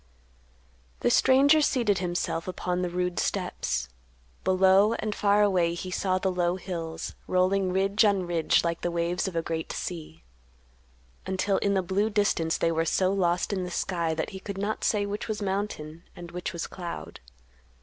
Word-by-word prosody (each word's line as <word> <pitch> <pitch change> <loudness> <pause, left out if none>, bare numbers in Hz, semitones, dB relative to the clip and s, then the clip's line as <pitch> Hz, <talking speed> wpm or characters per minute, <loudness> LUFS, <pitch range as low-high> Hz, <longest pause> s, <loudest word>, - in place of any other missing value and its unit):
The - - +2
stranger 280 +4 +5
seated 235 -9 +2
himself 175 -2 -2
upon 180 0 -2
the 180 - -1
rude 180 0 -1
steps. 60 -1 -1 0.6
Below 190 +3 +4
and 215 -2 -3
far 205 0 +3
away 180 -4 +2
he 185 +1 -6
saw 185 0 0
the 190 0 0
low 175 -1 +1
hills, 165 -3 -5
rolling 185 +1 +2
ridge 195 +3 +2
on 200 -3 +2
ridge 170 -2 +2
like 170 -1 -1
the 175 - -1
waves 170 +2 -1
of 185 - -5
a 165 - 0
great 160 -1 -3
sea, 155 - -6 1.0
until 190 +1 +1
in 200 -1 +1
the 190 - +1
blue 200 +4 0
distance 205 -6 +1
they 165 - +1
were 165 0 +1
so 185 +3 +1
lost 180 0 +1
in 190 -2 -1
the 180 - -4
sky 170 -2 -1
that 160 - -3
he 190 - -7
could 200 0 -6
not 205 +2 -2
say 205 -2 +2
which 205 +1 -4
was 215 -2 -3
mountain 190 -6 -3
and 175 -1 -9
which 180 0 -4
was 170 - -4
cloud. 175 -2 -7
185 Hz, 175 wpm, -27 LUFS, 170-200 Hz, 1.0 s, stranger